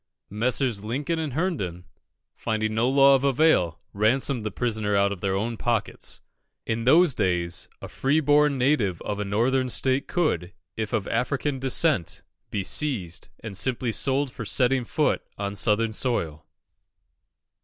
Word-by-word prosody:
Messrs. 115 0 -1
Lincoln 145 +9 -2
and 155 -5 -3
Herndon, 110 - -2 0.5
finding 110 0 -2
law 135 +4 +5
of 135 - +3
no 140 - +2
avail, 125 - +2
ransomed 120 +4 +1
the 110 - -2
prisoner 110 -2 -1
out 100 0 +3
of 95 -3 -6
their 95 -1 0
own 115 +4 -2
pockets. 115 -3 -2 0.4
In 115 0 -2
those 160 +3 +5
days, 90 -3 -1
a - - -5
free 140 +4 +1
born 145 -1 +3
native 125 - +1
of 105 -1 -3
a - - 0
Northern 125 +6 +1
state 130 +2 0
could, 95 - -1 0.2
if 110 -2 -3
of 105 -3 -1
African 140 +1 -1
descent, 135 - +1 0.3
be 100 -2 -2
seized 95 - -3
and 110 -3 -7
sold 125 +6 +2 0.2
simply 140 +3 +1
for 115 - -6
setting 125 +4 +1
foot - - 0 0.2
on 100 0 -4
Southern 110 +3 +1
soil. 85 - -1
115 Hz, 150 wpm, -25 LUFS, 100-135 Hz, 0.5 s, law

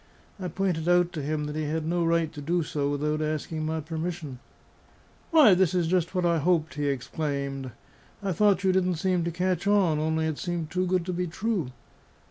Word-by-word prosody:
I 185 - -3
pointed 175 -2 -1
out 175 0 +3
to 155 - -3
him 150 +1 -2
that 150 0 -4
he 155 0 -2
had 155 +1 -2
no 170 +1 0
right 165 -1 +1
to 150 - -7
do 170 +4 0
so 145 -1 -2
without 150 +2 -1
asking 155 +1 -2
my 160 0 -2
permission. 160 -3 -5 0.9
"Why, 300 - +7
this 185 -1 +2
is 175 -2 +2
just 175 +1 0
what 180 -1 +1
I 170 -1 +3
hoped!" 160 0 +1
he 145 0 -2
exclaimed. 140 0 -3 0.5
"I 195 - 0
thought 200 +2 +3
you 190 - +4
didn't 185 -1 +1
seem 180 +1 0
to 170 - -1
catch 180 +2 -1
on; 190 -7 +3
only 160 +1 0
it 155 -2 -2
seemed 170 -3 -3
too 185 0 0
good 180 -1 +1
to 180 - -3
be 180 +1 -1
true." 185 - -2
165 Hz, 205 wpm, -27 LUFS, 155-180 Hz, 0.9 s, Why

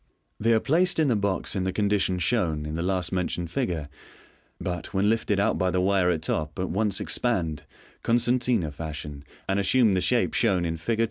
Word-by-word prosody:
They 115 +2 +2
are - - +4
placed 170 +9 +1
in 155 -3 +3
the 120 - +3
box 100 -1 -1
in 95 - 0
the 95 - 0
condition 100 -2 +1
shown 85 -6 0
in 75 - -5
the 85 - -2
last 90 0 -1
mentioned 90 -2 -2
figure; 85 -4 -2 0.7
but 90 +2 -5
when 100 +3 +3
lifted 105 -3 0
out 100 +3 +1
by 95 - +2
the 90 0 0
wire 95 -1 +2
at 80 -3 -1
top, 75 -1 -2
at 95 0 -2
once 100 0 0
expand, 80 - -1 0.4
concertina 120 -6 +1
fashion, 75 -2 -7 0.2
and 95 +1 +1
assume 110 +2 +4
the 90 - +1
shape 120 +3 +1
shown 95 -7 +2
in 85 0 -2
Fig. 110 +8 -2
95 Hz, 195 wpm, -26 LUFS, 85-110 Hz, 0.7 s, are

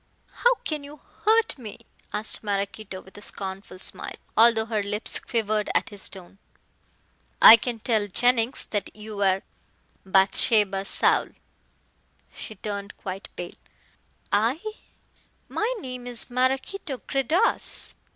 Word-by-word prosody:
"How - - +3
can 305 -2 -2
you 290 +1 -11 0.3
hurt 445 -7 +3
me?" 220 -4 -10 0.3
asked 215 +1 0
Maraquito 200 -1 -3
with 190 - -18
a - - -14
scornful 195 -1 -6
smile, - - -3 0.2
although 225 0 +5
her 220 -2 -1
lips 205 +2 -1
quivered 215 -2 -1
at - - +1
his 205 -2 -4
tone. 190 0 -12 1.0
"I 225 - +12
can 235 +1 -3
tell 220 -2 0
Jennings 245 +4 +2
that 205 -2 -3
you 210 -1 -7
are 190 -1 +2 0.6
Bathsheba 195 +1 +3
Saul!" - - +3 1.1
She 220 - -8
turned 200 0 -6
quite 190 0 -7
pale. 175 - -6 0.8
"I? 230 +8 +2 0.9
My 440 +3 -1
name 255 -6 -7
is 245 0 0
Maraquito 265 +5 -1
Gredos." 290 - +2
215 Hz, 120 wpm, -25 LUFS, 200-250 Hz, 1.1 s, I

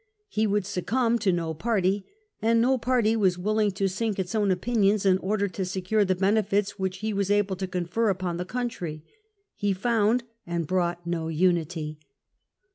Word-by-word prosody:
He 215 +1 +1
would 205 -1 +1
succumb 230 +5 0
to 200 -3 +2
no 165 -2 -1
party, 195 +1 0 0.3
and 230 +1 +3
no 255 +2 +3
party 230 -2 +2
was 190 -5 +2
willing 210 +3 +1
to 195 0 0
sink 205 +2 -2
its 190 0 -3
own 210 -2 +2
opinions 200 +1 +2
in 190 -1 +4
order 200 +1 0
to 190 +2 -4
secure 190 +3 0
the 185 -1 +1
benefits 200 +1 +1
which 190 0 -2
he 215 0 -1
was 200 -1 -1
able 205 -2 +2
to 190 0 -3
confer 180 +5 0
upon 185 -3 -1
the 180 - -2
country. 180 -10 -4 0.5
He 205 -2 0
found 225 +3 +2 0.2
and 170 -1 -2
brought 175 0 -1
no 170 -2 -2
unity. 160 -2 0
195 Hz, 175 wpm, -26 LUFS, 180-215 Hz, 0.5 s, in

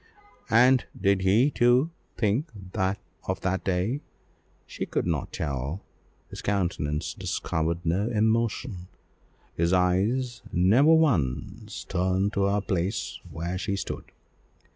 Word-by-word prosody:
And 125 +3 +5
did 100 -1 +3
he, 110 +10 +4
too, 125 +6 +3 0.3
think 115 +8 +1 0.8
of 95 - -2
that 95 0 -1
day? 95 +9 0 0.6
She - - -5
could - - -1
not 80 -4 -1
tell, 70 +5 -3 0.5
his - - -7
countenance 85 -6 -1
discovered 85 +2 -2
no 95 +7 +1
emotion, 110 -4 0 0.7
his 85 +2 +1
eyes 105 +8 +1
never 110 - +5
once 115 - +1
turned 95 +2 0
to 100 0 +2
the 100 +1 +1
place 95 +2 -2
where 85 +3 -4
she 100 - -1
stood. - - -5
95 Hz, 115 wpm, -27 LUFS, 90-115 Hz, 0.8 s, And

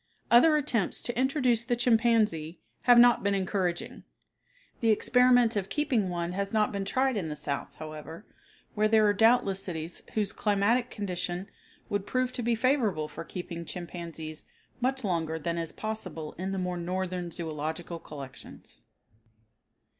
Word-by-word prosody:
Other 305 +7 +7
attempts 245 -10 0
to 240 - -1
introduce 255 -3 +2
the 240 0 0
chimpanzee 225 -9 +2 0.3
have 245 -1 +7
not 240 0 +7
been 200 0 +1
encouraging. 185 -2 -2 0.8
The 230 - +2
experiment 245 +1 +4
of 195 -2 -2
keeping 250 -10 0
one 170 -1 -2
has 200 +2 -2
not 215 -1 +2
been 200 -1 -3
tried 260 +3 +1
in 170 -6 -2
the 150 - -4
South, 145 -1 -4
however, 155 +4 -9 0.5
where 215 0 +2
there 220 0 +4
are 205 - +4
doubtless 205 -3 +3
cities 165 -2 -5
whose 205 -2 0
climatic 215 +4 +1
condition 185 -1 -4 0.4
would 205 0 -2
prove 255 0 0
to 255 - -2
be 235 0 +1
favorable 225 - +1
for 150 - -8
keeping 170 -1 -6
chimpanzees 165 -2 -6 0.3
much 260 +1 0
longer 165 -5 -1
than 170 +2 -2
is 165 -1 -2
possible 185 -8 -5
in 190 +2 -4
the 195 - -2
more 180 -1 -2
northern 180 0 -3
zoological 160 +1 -5
collections. 135 -4 -11
195 Hz, 150 wpm, -29 LUFS, 170-235 Hz, 0.8 s, Other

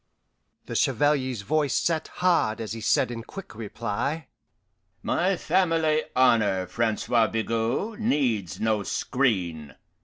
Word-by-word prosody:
The - - -7
Chevalier's 130 -7 +1
voice 145 +2 +1
set 160 -2 0
hard 170 -12 +1
as 110 -1 -4
he 115 - -6
said 130 +3 +2
in 115 -1 -5
quick 195 - -10
reply, 115 +7 -4 0.7
"My 185 +1 +1
family 165 -3 +1
honour, 110 -7 +3
Francois 110 +3 +1
Bigot, 115 - -2
needs 120 - 0
no 110 -1 +1
screen. 95 - -1
120 Hz, 115 wpm, -26 LUFS, 110-155 Hz, 0.7 s, honour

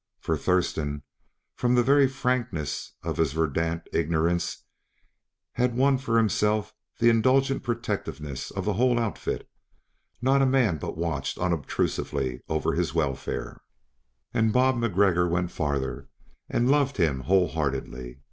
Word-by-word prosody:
For 80 - -1
Thurston, 75 -3 0 0.5
from 125 0 +1
the 120 - +4
very 140 +2 +5
frankness 125 - -2
of - - -3
his 80 -4 +1
verdant 80 +1 -1
ignorance, 85 +1 0 0.9
had 125 -1 0
won 135 0 +3
for 115 -3 0
himself 105 0 +1 0.2
the 120 0 +5
indulgent 130 +4 +3
protectiveness 105 - -4
of - - -5
the 105 - +1
whole 120 +4 +2
outfit; 115 -3 -2 0.7
not 135 +2 +3
a 135 - +4
man 125 - +2
but - - -5
watched 80 -5 -2
unobtrusively 70 -6 -1
over 80 -1 0
his 85 -1 -1
welfare 75 -5 -2 0.7
and 110 -1 +2
Bob 130 +2 +3
MacGregor 95 -6 +2
went 90 +1 -1
farther 70 -3 -2 0.4
and 120 +3 +2
loved 140 -2 +2
him 80 -8 +2
whole 90 +4 +2
heartedly. 65 -5 -3
90 Hz, 130 wpm, -26 LUFS, 80-120 Hz, 0.9 s, very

